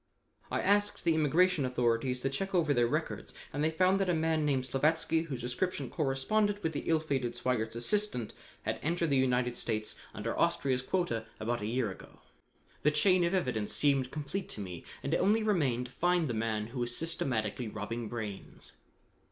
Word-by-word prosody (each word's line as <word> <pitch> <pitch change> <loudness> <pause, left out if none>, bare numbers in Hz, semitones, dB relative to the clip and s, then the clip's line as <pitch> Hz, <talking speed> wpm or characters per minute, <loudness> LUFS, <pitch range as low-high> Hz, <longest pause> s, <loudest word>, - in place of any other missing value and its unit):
I - - 0
asked 205 0 +2
the 165 - +3
immigration 160 +2 +3
authorities 125 0 +1
to 135 - 0
check 195 +7 -3
over 160 -5 +3
their 120 -2 +3
records - - -3 0.2
and 145 +2 -1
they 155 - +3
found 185 +4 +3
that 190 - +1
a 175 - +3
man 160 -1 +1
named 135 -3 +1
Slavatsky 160 +5 +1
whose 130 -5 -4
description 130 +3 -2
corresponded 205 +9 0
with 160 0 0
the 145 - -4
ill 160 -1 +4
fated 135 -6 -2
Sweigert's 120 -2 -1
assistant 125 - 0 0.3
had - - -2
entered 165 0 0
the 135 - +4
United 125 -1 +2
States 110 -2 -2 0.2
under 115 +2 -3
Austria's 140 -6 +2
quota 125 -7 -1
about 120 +1 -1
a 105 - -2
year 115 -2 0
ago. - - -13 0.6
The 150 - +4
chain 180 +4 +3
of 170 +2 +1
evidence 125 - 0
seemed 140 -3 +2
complete 150 +7 -4
to - - -3
me, 90 -4 -6 0.2
and 140 - -1
it - - +4
only 215 +4 +3
remained 140 - +1
to 125 - -10
find 175 +2 +2
the 120 - -2
man 110 -1 -1
who 130 - -4
was 120 0 0
systematically 120 -9 -1
robbing 110 +2 -4
brains. 110 -5 -6
135 Hz, 185 wpm, -31 LUFS, 120-170 Hz, 0.6 s, ill